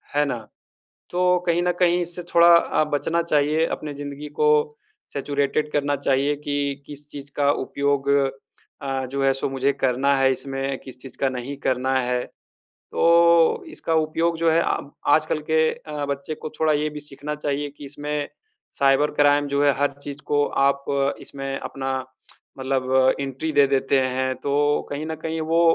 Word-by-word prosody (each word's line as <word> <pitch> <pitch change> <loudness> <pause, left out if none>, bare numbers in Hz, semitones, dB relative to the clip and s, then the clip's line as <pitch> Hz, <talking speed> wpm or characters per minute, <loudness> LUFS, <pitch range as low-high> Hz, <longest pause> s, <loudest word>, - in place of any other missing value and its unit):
है 145 0 +3
ना? 120 -6 -4 0.6
तो 180 0 +2
कहीं 170 0 +2
न 180 - +2
कहीं 175 0 +3
इससे 175 0 -5
थोड़ा 170 0 +7
अ, 170 - +2
बचना 165 +4 +1
चाहिए, 155 0 +2
अपनी 150 -1 -5
जिंदगी 145 +1 -7
को 150 - +5 0.6
सैचुरेटेड 145 +1 -1
करना 145 0 +1
चाहिए 140 +1 +1
कि 140 -1 -2
किस 145 0 -10
चीज़ 145 -1 -9
का 145 -1 +3
उपयोग 140 0 0 0.7
अ, 135 -1 -2
जो 135 +2 -3
है, 135 - +4
सो 135 +1 -2
मुझे 135 +1 0
करना 135 +1 +1
है 135 0 +4
इसमें, 135 0 -4
किस 130 -1 -11
चीज़ 135 - -10
का 135 - +2
नहीं 130 +2 -5
करना 130 +1 +1
है। 125 0 -1 0.7
तो 170 - +4
इसका 245 - -3
उपयोग 160 +1 +1
जो 165 0 +3
है 165 +1 +4
आ - - 0 0.4
आजकल 155 0 +1
के 160 0 +4
अ, 150 -2 -6
बच्चे 140 +2 -4
को 155 - -7
थोड़ा 155 -1 +3
ये 150 +1 0
भी 150 0 -7
सीखना 145 +1 -6
चाहिए 145 -1 -2
कि 145 - -10
इसमें 145 +1 -4 0.5
साइबर 140 +2 +3
क्राइम 145 0 +3
जो 140 +1 +1
है, 145 - +5
हर 145 0 +1
चीज़ 140 0 -9
को 145 0 +2 0.2
आप 140 0 -1 0.4
इसमें 135 0 -5
अपना 135 -1 -5 0.7
मतलब 130 0 +2
एंट्री 140 +3 -3
दे 145 -2 +5
देते 135 0 +2
हैं। 130 0 0
तो 145 +2 +1
कहीं 145 +2 -4
न 160 - -3
कहीं 160 0 -2
वो 165 - +4
145 Hz, 170 wpm, -23 LUFS, 135-155 Hz, 0.7 s, थोड़ा